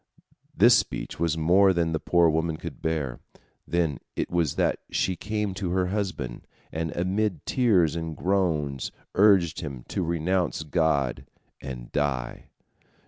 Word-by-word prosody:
This - - +7
speech - - -2
was 80 -1 +1
more 95 +5 +5
than 85 -2 0
the 80 - -1
poor 85 +1 +3
woman 80 0 0
could - - -8
bear. 75 -6 -2 0.5
Then 80 -4 0 0.2
it - - -2
was 85 -5 +1
that - - +1
she 95 - 0
came 105 0 -2
to 95 -1 -3
her 95 0 +2
husband, 95 - -3 0.2
and 80 0 -3
amid 95 -1 -1
tears 95 - +3
and 80 -2 -4
groans 80 -8 0 0.2
urged 95 -5 +4
him 70 -6 -6
to - - -2
renounce 85 0 0
God 75 -5 0 0.3
and 60 -3 -7
die. 70 -4 -2
85 Hz, 140 wpm, -26 LUFS, 75-95 Hz, 0.5 s, This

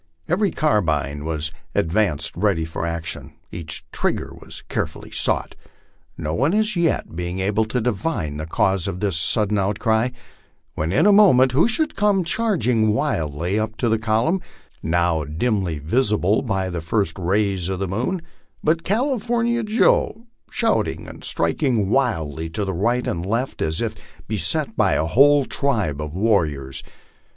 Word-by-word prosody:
Every 195 +4 +2
carbine 75 - 0
was 80 -1 -1 0.2
advanced 80 -5 +1
ready 90 -3 +1
for 80 +1 -4
action, 85 -1 -5 0.2
each 80 -3 -6
trigger - - -2
was - - -9
carefully - - -4
sought, - - +1 0.6
no 75 - -3
one 140 - +1
as 215 -1 +2
yet 170 - 0
being 90 +2 -3
able 100 +3 +1
to 120 +3 -2
divine 105 - -2
the 75 +1 -5
cause 95 +2 +1
of 95 -2 -4
this 100 -3 0
sudden 105 +5 +3
outcry, 110 +4 +1 0.6
when 80 +2 -2
in 100 - +3
a 210 - +7
moment 155 -12 +6
who 140 - +4
should 305 +6 0
come 200 -2 +2
charging 160 - +1
wildly 85 +3 -1
up 110 0 -3
to 120 - 0
the 110 0 +2
column, 115 - +1 0.4
now 85 -1 +1
dimly 90 - -1
visible 105 - +1
by 95 -7 -2
the 85 -1 -3
first 100 +6 -1
ra3 90 -3 -4 0.3
r - - -4
s 90 +1 -2
of 95 - -2
the 95 +1 -2
moon, 125 - -2 0.4
but 165 +2 +1
California 235 +1 0
Joe, 230 - +2 0.2
shouting - - 0
and - - -11
striking 115 -9 0
wildly 80 - 0
to 100 +5 -2
the 95 - -2
right 120 +8 0
and 85 - -2
left 115 +7 -2
as 80 +4 0
if 110 -2 -2 0.3
beset - - +1
by - - +3
a 80 - +1
whole 140 - +5
tribe 105 - -1
of 75 +1 -6
warriors. 80 -11 0
105 Hz, 160 wpm, -22 LUFS, 85-135 Hz, 0.6 s, a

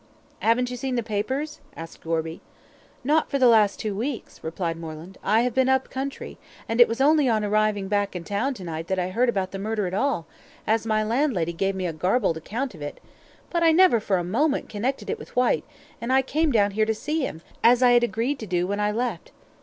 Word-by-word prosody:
"Haven't 245 +2 +2
you 250 - -4
seen 260 +1 -2
the 240 - 0
papers?" 260 +9 -3 0.2
asked 165 0 -9
Gorby. 165 0 -3 0.6
"Not 305 +4 +2
for 280 - 0
the 260 - +4
last 215 -4 +4
two 215 -2 -2
weeks," 235 +5 -5
replied 165 +1 -3
Moreland. 165 +3 -9
"I 215 +3 +3
have 245 -1 0
been 260 +1 +2
up 265 0 +1
country, 270 +1 -5 0.3
and 230 +2 +2
it 240 - +9
was 230 - -4
only 290 -1 +4
on 215 -2 +1
arriving 210 -1 +1
back 205 -1 0
in 175 - -4
town 215 +10 -1
to 190 - -9
night 165 -1 -5
that 190 - -1
I 180 0 -1
heard 240 +6 +2
about 190 -5 -1
the 195 - -5
murder 215 0 -1
at 180 - -4
all, 220 - 0 0.4
as 220 +1 +1
my 215 -1 +2
landlady 220 - 0
gave 195 +3 -1
me 185 -1 -3
a 170 - -2
garbled 185 +2 +1
account 235 - -4
of 160 - -13
it, 145 - -6 0.5
but 340 - 0
I 330 -1 +6
never 335 -8 +5
for 205 -2 0
a 175 - -1
moment 275 - 0
connected 245 +6 -3
it 450 - -3
with - - -12
Whyte, 250 -1 +2 0.4
and 235 +2 -2
I 265 0 +4
came 310 +3 +1
down 205 -4 +3
here 215 +2 +1
to 220 - +1
see 300 +8 -2
him, 160 - -9 0.2
as 245 +2 +5
I 245 - +6
had 240 0 +5
agreed 240 +5 -1
to 220 - -6
do 175 -1 0
when 200 +2 -2
I 210 0 +1
left. 230 -4 -3
220 Hz, 230 wpm, -25 LUFS, 190-255 Hz, 0.6 s, it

